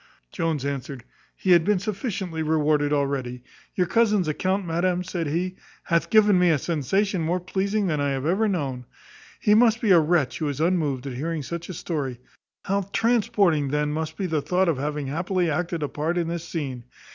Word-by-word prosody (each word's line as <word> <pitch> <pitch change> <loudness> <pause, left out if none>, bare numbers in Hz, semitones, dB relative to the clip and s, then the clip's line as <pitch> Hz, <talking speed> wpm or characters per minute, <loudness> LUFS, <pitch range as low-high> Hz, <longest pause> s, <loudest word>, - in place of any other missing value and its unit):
Jones 160 -4 -1
answered, 140 -2 -4 0.3
"He 185 - 0
had 170 -2 +6
been 205 +3 +2
sufficiently 190 -4 -3
rewarded 150 -2 +1
already. 135 -4 -1 0.3
Your 180 - +2
cousin's 210 -2 +2
account, 185 +5 -1
madam," 175 +2 0
said 175 -3 -3
he, 180 +5 -2 0.3
"hath 170 -1 0
given 210 -4 +5
me 180 -1 +4
a 160 - +4
sensation 175 +6 0
more 170 +3 0
pleasing 195 +3 -1
than 155 -5 0
I 145 - +1
have 135 0 -2
ever 195 +7 +2
known. 135 -10 -2 0.5
He 210 - +3
must 225 0 +5
be 220 -3 +2
a 175 - +8
wretch 155 -6 +1
who 155 -3 -1
is 140 -1 -4
unmoved 155 -6 0
at 135 - -4
hearing 155 +4 -3
such 170 +5 -6
a 185 - -5
story; 140 -8 -3 0.5
how 200 0 -1
transporting 205 - +2
then 150 +1 0
must 155 +1 -4
be 195 - -2
the 160 -4 0
thought 185 +5 +1
of 150 -5 0
having 150 0 -2
happily 175 +4 -1
acted 170 +1 -2
a - - 0
part 160 +5 -2
in 170 -1 0
this 170 0 -4
scene! 135 -7 -4
165 Hz, 190 wpm, -24 LUFS, 145-185 Hz, 0.5 s, a